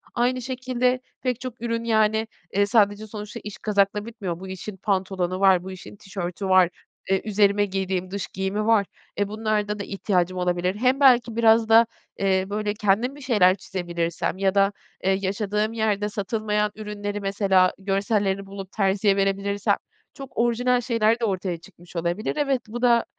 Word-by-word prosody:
Aynı 250 +1 +1
şekilde 255 0 0 0.2
pek 250 -2 -1
çok 250 -2 -7
ürün, 230 -1 -2
yani, 220 -1 +2 0.3
eee, 200 +1 +3
sadece 205 -1 +2
sonuçta 210 -1 -7
iş 210 -1 -7
kazakla 205 0 +1
bitmiyor. 200 -7 -5
Bu 190 - -8
işin 190 +2 -7
pantolonu 185 -2 -1
var, 190 -2 +5
bu 190 - -7
işin 185 +2 -10
tişörtü 195 -1 -5
var, 185 -2 +6 0.4
eee, 195 0 +2
üzerime 205 -1 +3
giydiğim 190 -1 -2
dış 200 0 -3
giyimi 190 +3 -2
var. 220 -3 +4 0.3
Eee, 205 - +1
bunlarda 210 -1 -1
da - - -3
ihtiyacım 185 -2 -1
olabilir. 180 +1 0
Hem 255 +5 +2
belki 245 -4 +5
biraz 225 -1 +4
da, 225 +1 +7 0.3
eee, 190 -1 +2
böyle, 210 0 -1
kendim 210 +6 +1
bir 290 - -12
şeyler 205 -8 +4
çizebilirsem 175 -3 -3
ya 195 0 +1
da, 195 0 +4 0.3
eee, 190 - +3
yaşadığım 210 +2 -1
yerde 210 -2 0
satılmayan 210 0 -1
ürünleri 210 -1 -5
mesela 195 -2 +3
görsellerini 195 0 0
bulup 195 -1 -8
terziye 195 0 +2
verebilirsem 200 +1 +1 0.4
çok 270 -2 -11
orijinal 245 +1 +2
şeyler 230 -2 +2
de 235 - 0
ortaya 185 -3 -2
çıkmış 175 +1 -17
olabilir. 175 +5 -2
Evet, 275 -4 +1
bu 235 +3 -6
da 235 -2 +4
205 Hz, 165 wpm, -24 LUFS, 190-225 Hz, 0.4 s, da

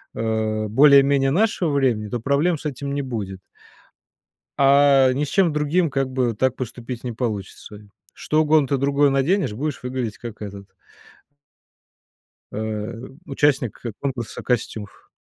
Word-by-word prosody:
а, 110 -1 -1
более-менее 140 +2 +5
нашего 185 -2 +1
времени, 125 -7 0
то 120 - -3
проблем 140 +8 +1
с - - -14
этим 140 -1 -4
не 140 - -1
будет, 105 -8 -5 1.2
а 140 -1 +5
ни 140 +3 -1
с - - -6
чем 180 +1 +2
другим 150 +4 +1
как 135 -1 -1
бы 125 -3 0
так 130 +4 0
поступить 120 0 -7
не 125 - -3
получится. 105 -3 -5 0.4
Что 155 +1 0
угодно 155 -2 +3
ты 140 - +1
другое 140 +1 +2
наденешь, 135 - +1
будешь 145 +5 -4
выглядеть 125 -4 -4
как 115 -3 -9
этот 100 -1 -9 1.8
э, 110 +1 -4 0.3
участник 135 -5 0 0.2
конкурса 130 -5 -4
костюмов. 110 -4 -4
130 Hz, 135 wpm, -22 LUFS, 115-140 Hz, 1.8 s, более-менее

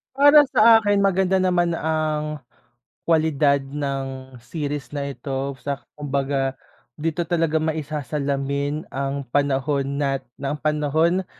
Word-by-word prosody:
Para 290 +2 +8
sa 225 0 +6
akin, 205 -1 +2
maganda 190 -1 +2
naman 175 -2 +2
ang 155 -2 -2 0.6
kwalidad 155 -3 +3
ng 135 -2 -5
series 145 +3 -4
na 140 -1 -3
ito, 135 +1 -4
sa 140 0 -4 0.2
kumbaga 135 -2 -1 0.4
dito 165 +3 -2
talaga 165 -2 +1
maisasalamin 145 -2 -2
ang 140 0 -3
panahon 140 0 0
nat 135 -2 0 0.2
ang 140 +1 -2
panahon 155 +4 +1
145 Hz, 110 wpm, -23 LUFS, 140-160 Hz, 0.6 s, Para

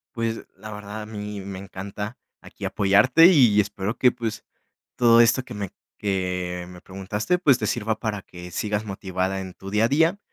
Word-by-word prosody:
Pues, 115 -1 -2
la 110 - -9
verdad, 105 +1 -7
a - - -8
mí 105 -1 -6
me 95 0 -7
encanta 100 +3 -7 0.2
aquí - - -9
apoyarte, 105 - +5
y 125 - +6
espero 105 +2 -4
que, 125 - +5
pues, 110 -3 -4 0.5
todo 115 -1 +6
esto 120 +3 +4
que 125 - -10
me 100 -3 -5 0.3
que 90 -3 -2
me 90 0 -11
preguntaste, 105 - -2
pues 140 -8 +4
te - - -1
sirva 110 -1 -1
para 105 -3 -3
que 90 -1 -11
sigas 105 +3 -2
motivada 95 -1 -2
en 95 -1 -8
tu 95 +1 -10
día 105 +2 +2
a - - +3
día 160 +7 +3
105 Hz, 185 wpm, -24 LUFS, 95-115 Hz, 0.5 s, y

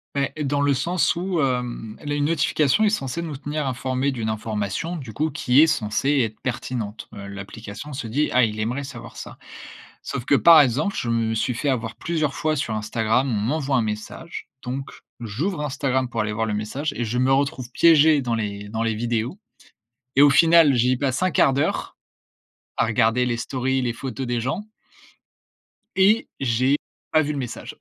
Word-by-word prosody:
Mais 140 -1 0
dans 145 0 0
le 145 -1 +3
sens 170 +7 +1
où, 175 -1 -1
hem, 125 -4 -2
la 145 0 -3
une 145 0 0
notification 150 +3 +2
est 210 - +5
censée 165 - -2
nous 155 -4 -5
tenir 145 +2 -3
informé 130 +1 -1
d'une 115 -4 -3
information 110 - -3
du 130 -8 -7
coup 155 +7 -1
qui 130 -1 +2
est 160 - +8
censée 135 +1 +1
être 110 -4 -1
pertinente. 115 -4 -4
Heu, 100 -1 -8
l'application 100 +7 -8
se 130 - -5
dit: 140 +7 0
«Ah, 125 0 +4
il 110 -1 -1
aimerait 125 +6 -2
savoir 140 - -9
ça». - - -9 0.6
Sauf 120 - -4
que 140 - +4
par 165 +1 +8
exemple, 145 - +1
je 120 - -2
me 115 -1 +1
suis 115 +2 -1
fait 145 +5 -1
avoir 115 -4 -2
plusieurs 155 -4 -2
fois 155 -2 0
sur 125 -6 -2
Instagram, 110 +4 0
on - - 0
m'envoie 135 +6 0
un 120 - +3
message, 110 +10 -6
donc 130 +2 -5 0.3
j'ouvre 150 - -3
Instagram 135 -3 -1
pour 115 -2 -2
aller 105 0 -2
voir 110 +1 -1
le 110 - -2
message 110 +9 -3
et 120 - -2
je 115 +2 -2
me 130 +2 +3
retrouve 135 -2 -1
piégé 155 -2 +5
dans 120 -2 -1
les 105 -2 -4
dans 110 +1 -2
les 115 -1 0
vidéos 120 - -2 0.8
et 140 - +7
au 145 - +7
final, 165 -2 +6
j'y 125 +1 +2
passe 135 +2 -1
1/4 180 -6 +3
d'heure 140 - -1 0.8
à - - +2
regarder 115 +2 +2
les 120 -2 -1
stories, 130 +2 -1
les 120 -2 -1
photos 130 +1 -5
des 120 -1 -1
gens 130 - -3 1.3
et 200 +4 +4
j'ai 130 +2 +2 0.3
pas 155 - +5
vu 150 - -1
le 145 - -4
message. 125 -4 -6
130 Hz, 190 wpm, -23 LUFS, 115-145 Hz, 1.3 s, est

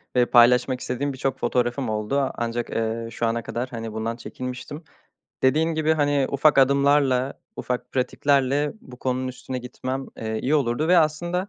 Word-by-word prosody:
ve 125 -1 +4
paylaşmak 125 +2 +4
istediğim 135 +3 -3
birçok 135 0 -2
fotoğrafım 120 +1 0
oldu. 110 +6 -1
Ancak, 120 0 -3
eee, 115 0 -2
şu 115 - -2
ana 115 0 -1
kadar, 125 +2 -4
hani, 115 -2 -6
bundan 110 +1 -3
çekinmiştim. 125 +5 -7 0.6
Dediğim 155 +5 +2
gibi, 155 0 +2
hani, 145 -2 +2
ufak 140 +1 +3
adımlarla, 140 -1 +3 0.2
ufak 125 0 -4
pratiklerle 140 +2 +1
bu 125 -1 -13
konunun 130 0 -1
üstüne 130 0 -6
gitmem, 130 +2 -5
eee, 110 0 -3
iyi 145 +4 +1
olurdu 140 +2 +1
ve 180 -1 +6
aslında 175 +5 0
130 Hz, 155 wpm, -24 LUFS, 120-140 Hz, 0.6 s, ve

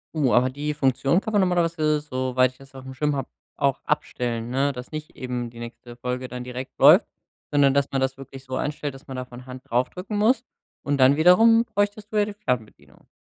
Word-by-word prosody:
Oh, 140 -6 +2
aber 125 +1 +4
die 145 +3 -3
Funktion 135 +4 +2
kann 220 - -5
man 210 - +3
normalerweise, 165 -5 +1
soweit 130 -3 0
ich 130 - -26
das 135 0 -17
aufm 130 0 -9
Schirm 150 +2 0
habe, 135 - -4 0.3
auch - - +1
abstellen, 120 -1 -2
ne, 135 +3 +1
dass 125 0 -9
nicht 155 -1 -7
eben 125 -2 -4
die 115 0 -13
nächste 120 0 -9
Folge 125 +1 -4
dann 125 0 -6
direkt 125 +1 -7
läuft, - - +7 0.4
sondern 140 -2 +4
dass 140 0 +1
man 135 - 0
das 135 0 -1
wirklich 135 -1 -11
so 130 -1 -5
einstellt, 145 -1 -3
dass 135 - -14
man 135 - -7
da 130 - -3
von 125 0 -12
Hand 130 0 -9
drauf 125 +2 +1
drücken 195 +3 -5
muss. 225 +3 +3 0.4
Und 145 0 0
dann 130 +2 +6
wiederum 225 +9 +6
bräuchtest 205 -1 -2
du 215 - -1
ja 205 - +4
die 210 - -6
Fernbedienung. 115 - -5
135 Hz, 220 wpm, -24 LUFS, 125-155 Hz, 0.4 s, läuft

